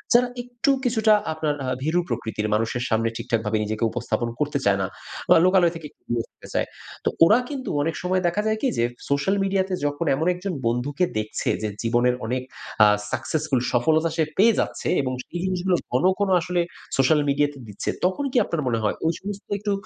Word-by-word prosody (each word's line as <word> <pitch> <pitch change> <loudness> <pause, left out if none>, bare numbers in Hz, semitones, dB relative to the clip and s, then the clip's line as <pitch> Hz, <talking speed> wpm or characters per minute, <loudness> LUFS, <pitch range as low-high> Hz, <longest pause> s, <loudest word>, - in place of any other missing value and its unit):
যারা 245 +1 +5 0.2
একটু 245 +2 0
কিছুটা 220 -3 +4 0.2
আপনার 155 -2 -1
আ - - -3 0.2
ভীরু 160 +4 +2
প্রকৃতির। 110 -1 -2
মানুষের 115 +3 -1
সামনে 115 0 +2
ঠিকঠাকভাবে 110 -1 -1
নিজেকে 110 +2 -3
উপস্থাপন 120 0 -2
করতে 150 -1 0
চায় 100 -1 +4
না, 95 - 0 0.4
বা - - +8
লোকালয় 185 -2 +4
থেকে 165 -2 -7 0.2
দূরে 120 -1 0
থাকতে - - -16
চায়। - - 0 0.4
তো - - +4 0.2
ওরা 215 +7 +5
কিন্তু 270 -3 -5
অনেক 160 +2 -1
সময় 185 +1 +1
দেখা 190 +5 0
যায় 220 0 +1
কি, 275 - +2
যে 115 - +2 0.3
সোশ্যাল 140 +8 +2
মিডিয়াতে 190 -1 0
যখন 145 +3 -1
এমন 160 +5 -1
একজন 185 +1 -4
বন্ধুকে 140 +9 0
দেখছে, 110 0 -3
যে - - +1 0.2
জীবনে 120 +2 +3 0.2
অনেক 125 +2 -2 0.4
আ - - +7 0.2
সাকসেসফুল, 135 +2 0
সফলতা 160 +7 +3
সে 160 - +2
পেয়ে 225 +3 +6
যাচ্ছে - - -2
এবং 130 -1 -2
সেই 175 - -6
জিনিসগুলো 185 0 +1 0.2
ঘন, 125 +5 +1 0.2
ঘন 200 -1 +1
আসলে 180 +1 0 0.4
সোশ্যাল 140 +3 +4
মিডিয়াতে 145 0 +1
দিচ্ছে, 105 -2 -4 0.2
তখন 190 +10 0
কি 260 - 0
আপনার 165 - -2
মনে 115 -2 0
হয় 105 - +1
ওই 165 - +3
সমস্ত 200 0 -6 0.2
একটু 205 +1 -2
155 Hz, 190 wpm, -24 LUFS, 120-190 Hz, 0.4 s, বা